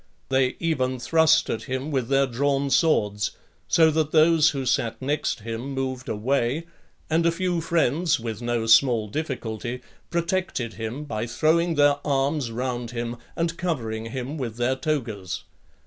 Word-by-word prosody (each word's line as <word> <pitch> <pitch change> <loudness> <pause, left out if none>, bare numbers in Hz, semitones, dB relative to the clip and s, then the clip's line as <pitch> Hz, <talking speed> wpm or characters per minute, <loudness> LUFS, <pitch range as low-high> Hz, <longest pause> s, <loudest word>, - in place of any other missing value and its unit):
They 130 -1 +2
even 130 -6 0
thrust 160 +4 +3
at 110 - -3
him 130 +4 -3
with 130 -5 0
their 135 +1 +3
drawn 140 +2 0
swords, 105 - +2 0.3
so 160 -1 +5
that 155 -1 0
those 160 0 +5
who 135 -2 -3
sat 115 -1 0
next 140 -3 -1
him 115 +5 -5
moved 130 -1 -3
away; 125 +5 0
(10) 170 - -21 0.4
and 165 +1 +3
a - - +4
few 175 0 -1
friends, 165 -1 +1
with 115 -1 -5
no 120 -1 -1
small 115 -1 +5
difficulty, 125 -3 -4 0.3
protected 170 -9 -1
him, 115 +6 -5
by 115 -6 -3
throwing 165 +7 +2
their 145 -1 +4
arms 140 -1 0
round 120 0 -3
him, 120 0 -4 0.2
and 165 0 -2
covering 115 -10 -2
him 130 +5 -5
with 120 -5 -4
their 120 +2 +1
togas. 120 - -3
135 Hz, 155 wpm, -25 LUFS, 120-155 Hz, 0.4 s, so